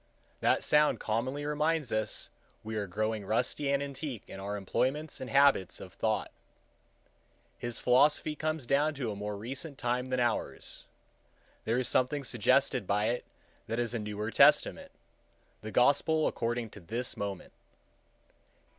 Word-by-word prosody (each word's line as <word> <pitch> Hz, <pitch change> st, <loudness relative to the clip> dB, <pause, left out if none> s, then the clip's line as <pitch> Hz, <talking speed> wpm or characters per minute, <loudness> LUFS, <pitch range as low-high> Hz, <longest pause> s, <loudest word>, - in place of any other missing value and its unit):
That -, -, +2 dB
sound 150 Hz, 0 st, +3 dB
commonly 130 Hz, +6 st, -2 dB
reminds 150 Hz, -2 st, 0 dB
us 110 Hz, -1 st, -1 dB
that -, -, -22 dB
we 110 Hz, 0 st, -4 dB
are 105 Hz, -2 st, -2 dB
growing 110 Hz, +3 st, -2 dB
rusty 125 Hz, +7 st, 0 dB
and 140 Hz, 0 st, +1 dB
antique 140 Hz, -4 st, -5 dB
in 95 Hz, -, -9 dB
our 100 Hz, +1 st, -4 dB
employments 135 Hz, +9 st, -1 dB
and 130 Hz, -, -5 dB
habits 140 Hz, -9 st, +4 dB
of -, -, -10 dB
thoughts. -, -, -1 dB, 1.3 s
His 120 Hz, 0 st, -4 dB
philosophy 145 Hz, +4 st, +3 dB
comes 155 Hz, -3 st, -2 dB
down 145 Hz, +4 st, +2 dB
to 125 Hz, -5 st, -3 dB
a -, -, -5 dB
more 105 Hz, 0 st, -4 dB
recent 135 Hz, +7 st, -4 dB
time 125 Hz, 0 st, -1 dB
than 130 Hz, -1 st, -1 dB
ours. 120 Hz, -2 st, -2 dB, 0.8 s
There 115 Hz, +2 st, +1 dB
is 125 Hz, -, 0 dB
something 140 Hz, +3 st, +1 dB
suggested 130 Hz, -1 st, +2 dB
by 105 Hz, +2 st, +1 dB
it 120 Hz, +1 st, -2 dB, 0.4 s
that 115 Hz, -, -2 dB
is 120 Hz, -1 st, 0 dB
a 120 Hz, -, -1 dB
newer 105 Hz, +1 st, -4 dB
testament,—the 110 Hz, -1 st, 0 dB
gospel 145 Hz, +6 st, +3 dB
according 115 Hz, -1 st, -2 dB
to -, -, -11 dB
this 115 Hz, +7 st, -2 dB
moment. 100 Hz, -2 st, -5 dB
125 Hz, 145 wpm, -30 LUFS, 110-140 Hz, 1.3 s, habits